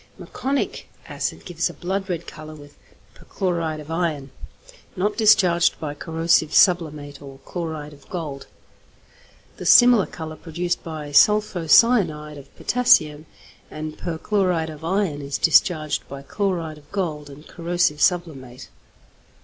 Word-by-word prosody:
Meconic 275 +1 -3 0.2
acid - - -4
gives 170 -2 -2
a - - -11
blood 190 +2 -4
red 170 -2 -3
colour 155 -1 -10
with 145 -1 -15 0.4
perchloride 170 -5 -3
of 150 +1 -10
iron, 160 -5 -2 0.6
not 205 +3 -1
discharged 190 -6 +3
by 150 -2 -4
corrosive 165 0 0
sublimate 155 -5 +2
or 135 -1 -11
chloride 160 -4 -6
of 140 -1 -19
gold. 150 -6 -6 1.1
The - - -8
similar 245 -5 +6
colour 160 -1 -8
produced 175 +1 -3
by 155 -3 -7
sulpho 205 +1 +3
cyanide 155 - +3
of 140 0 -15
potassium 155 -11 +2 0.4
and 155 0 -7
perchloride 175 -1 -1
of 155 0 -12
iron 175 -4 -1
is 140 0 -4
discharged 155 -2 +2
by 140 0 -8
chloride 165 -2 -3
of 145 0 -25
gold 155 -7 -3
and 145 +2 -13
corrosive 170 -3 -1
sublimate. 145 -9 -1
160 Hz, 130 wpm, -22 LUFS, 150-180 Hz, 1.1 s, similar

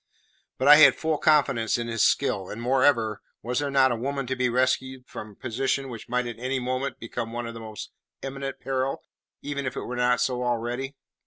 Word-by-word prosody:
But 130 - 0
I 150 +1 +10
had 155 - +8
full 160 -2 -1
confidence 135 -8 +3
in 120 0 -3
his 115 -1 -1
skill; 100 -9 +2
and, 105 - -6
moreover, 120 -3 +2 0.2
was 125 +3 -1
there 145 -1 -1
not 135 -2 +4
a - - +1
woman 135 +3 -3
to 130 +1 -2
be 125 -1 +1
rescued 130 +1 0
from 110 - -8
a 105 - -16
position 135 +3 -2
which 115 -1 -9
might 125 +1 0
at 120 -1 -6
any 130 +2 -1
moment 130 +2 -2
become 115 0 -5
one 120 0 -3
of 115 - -6
the 115 - -8
most 110 -1 -8 0.3
imminent 135 0 -5
peril, 135 0 -2 0.4
even 140 -2 -3
if 130 - -4
it - - -3
were 125 - -5
not 125 0 +2
so 125 -1 0
already? 125 +3 -2
125 Hz, 215 wpm, -26 LUFS, 120-135 Hz, 0.4 s, I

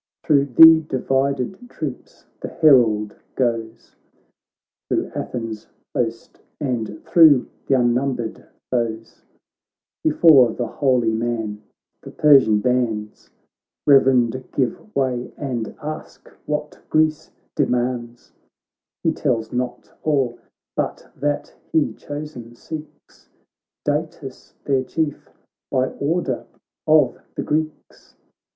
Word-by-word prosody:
Thro' 140 -3 +3
the 160 +5 +8
divided 135 - -1
troops 145 - -7
the - - -5
herald 110 -8 +3 0.2
goes. 115 -3 -2 0.9
Thro' - - -1
Athens' 115 -3 -5 0.3
host, 115 -1 -3 0.2
and 120 -7 -3
thro' 155 -7 +6 0.2
th' - - -3
un 120 -2 +3
numbered 125 -3 -3 0.2
foes; 115 -2 -3 0.8
Before 150 -6 +6
the 120 - -3
holy 120 -2 +1
man 110 -2 -2 0.4
the - - -10
Persian 135 -8 +5
bands 115 -3 -1 0.6
Reverend 130 -3 +4
give 125 -4 -1
way, 130 -3 -1
and 120 -6 -4
ask' 155 +1 -7 0.2
what 150 0 -3
Greece 155 0 +1 0.3
demands: 120 -1 -2 0.7
He 165 - +3
tells 120 -8 -1
not 125 0 -4
all, 135 -6 0 0.4
but - - -3
that 145 0 -2 0.2
he, 160 -2 +2
chosen, 145 -6 -8
seeks 155 +4 -11 0.6
Datis 145 -2 -4
their 135 -2 +1
Chief, 150 +2 -3 0.4
by 130 0 +1
order 145 -3 -2 0.4
of - - +4 0.2
the - - -3
Greeks. 155 0 -4
130 Hz, 100 wpm, -21 LUFS, 120-150 Hz, 0.9 s, the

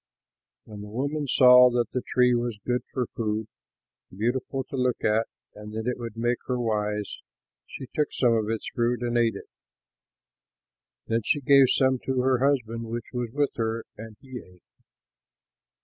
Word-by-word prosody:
When 105 -1 -10
the 105 - -8
woman 140 +6 -2
saw 125 -1 +7
that 120 -2 -1
the 125 - -2
tree 125 0 +2
was 120 -2 -1
good 125 0 0
for 125 -2 -1
food, 110 -1 -2 0.6
beautiful 125 +6 -2
to 135 +2 -8
look 125 -1 -1
at 110 +1 +2 0.3
and 105 0 -10
that 110 0 -4
it 125 0 -2
would 115 -2 -7
make 120 +1 0
her 125 -1 -1
wise, 105 -2 -2 0.5
she - - -8
took 150 - 0
some 120 -3 +2
of 110 -2 0
its 115 -1 -3
fruit 120 0 0
and 120 0 -1
ate 115 -1 +2
it. - - -9 1.6
Then 115 +1 0
she 145 - +1
gave 140 -1 +5
some 130 -1 +2
to 130 0 -2
her 130 -1 +2
husband 120 -4 0
who 115 +2 -5
was 120 -2 -3
with 145 +2 0
her, 115 0 -2
and 110 -1 -10
he 130 -2 -9
ate. 90 -4 -18
120 Hz, 170 wpm, -26 LUFS, 110-130 Hz, 1.6 s, saw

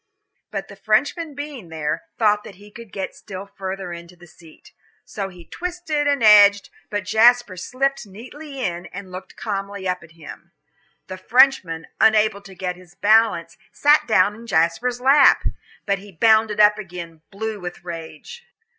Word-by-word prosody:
But - - -5
the - - -12
Frenchman 330 -4 0
being 285 - -8
there, 155 - -3
thought 210 -2 +2
that 200 - -11
he 205 +2 -16
could 230 -2 -12
get 190 -1 -5
still 195 -1 -9
further 190 -2 -6
into 170 +1 -11
the 175 0 -16
seat. 165 -1 -18 0.3
So 195 -2 -5
he 180 -2 -14
twisted 340 - -3
and 285 -4 +1
edged, 205 -1 +6 0.2
but 205 -1 -3
Jasper 225 0 +4
slipped 260 +6 -2
neatly 265 +8 -10
in, 175 -1 -4
and 190 0 -10
looked 185 +1 -10
calmly 200 -2 -5
up 180 0 -2
at 165 -1 -17
him. 165 +1 -13 0.5
The 185 - -8
Frenchman, 220 - +3
unable 215 -2 +3
to 195 -1 -14
get 180 -1 -4
his 180 0 -18
balance, 215 -4 +2
sat 295 +1 +3
down 205 -2 +3
in 230 +2 -13
Jasper's 220 +8 0
lap. 270 +2 +5 0.4
But 200 -1 0
he 200 +1 -13
bounded 220 +3 +3
up 210 0 +5
again, 170 -4 -9
blue 220 +1 -5
with 175 -1 -8
rage. 165 - -9
205 Hz, 165 wpm, -21 LUFS, 180-235 Hz, 0.5 s, edged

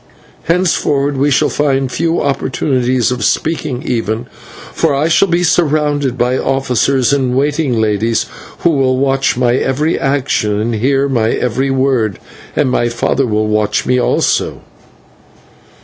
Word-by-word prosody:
Henceforward 150 -5 +1
we 140 +2 +1
shall 140 - +2
find 135 -3 0
few 165 +3 0
opportunities 130 -3 0
of 125 -3 -3
speaking, 150 +1 -1
even, 115 -1 -2 0.5
for - - +1
I 145 +3 +1
shall 165 +4 +3
be 175 0 +1
surrounded 150 -6 +1
by 125 +2 +1
officers 135 0 +1
and 130 -3 0
waiting 145 -3 0
ladies 110 +2 0 0.4
who 170 - +3
will 130 -3 +1
watch 135 -1 +1
my 125 -1 +2
every 145 +6 0
action 135 -7 0
and 115 +2 -1
hear 135 +5 +1
my 115 -5 0
every 130 +4 -1
word, 130 -6 0 0.4
and 140 -4 +1
my 120 -1 +1
father 125 +3 0
will 110 -1 0
watch 105 -1 0
me 125 0 +1
also." - - 0
135 Hz, 140 wpm, -14 LUFS, 120-145 Hz, 0.5 s, shall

